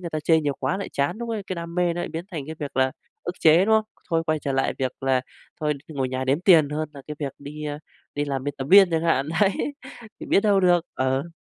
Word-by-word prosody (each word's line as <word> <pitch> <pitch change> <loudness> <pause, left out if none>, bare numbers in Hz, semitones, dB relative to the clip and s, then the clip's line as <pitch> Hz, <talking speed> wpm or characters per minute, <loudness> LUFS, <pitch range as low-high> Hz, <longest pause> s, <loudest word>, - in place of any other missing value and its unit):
người 170 -2 -6
ta 155 - -2
chê 160 -1 +4
nhiều 145 -2 -1
quá 135 +7 0
lại 200 - -5
chán, 140 +8 0
lúc 235 -1 -4
đấy 215 -3 -3
cái 185 - -3
đam 170 0 -6
mê 175 -1 +2
nó 175 - -3
lại - - -3
biến 165 +2 -5
thành 155 -4 -3
cái 160 - -6
việc 145 -3 -6
là 130 0 +2 0.3
ức 175 - -4
chế, 165 +4 +6
đúng 220 +1 +4
không? 220 -1 +3 0.3
Thôi 165 0 +2
quay 155 0 +1
trở 140 -2 -3
lại 135 0 +1
việc 130 -2 -1
là 135 -1 +2 0.4
thôi 150 -1 +1
ngồi 135 -4 -2
nhà 130 0 -3
đếm 135 +5 +1
tiền 165 -6 +6
hơn 155 0 -2
là 140 - -10
cái 150 - -5
việc 140 -3 -3
đi, 150 +2 -8
ờ, 145 0 -4 0.4
đi 145 0 -1
làm 135 -2 -3
bên 145 -1 -3
tập 135 - -3
viên 195 -2 +8
chẳng 165 0 0
hạn, 150 -4 +1
đấy, 200 - +5 0.7
thì - - -7
biết - - +4
đâu 200 -2 +3
được, 175 -2 +4
ừ. 130 +5 -1
155 Hz, 280 wpm, -24 LUFS, 140-175 Hz, 0.7 s, viên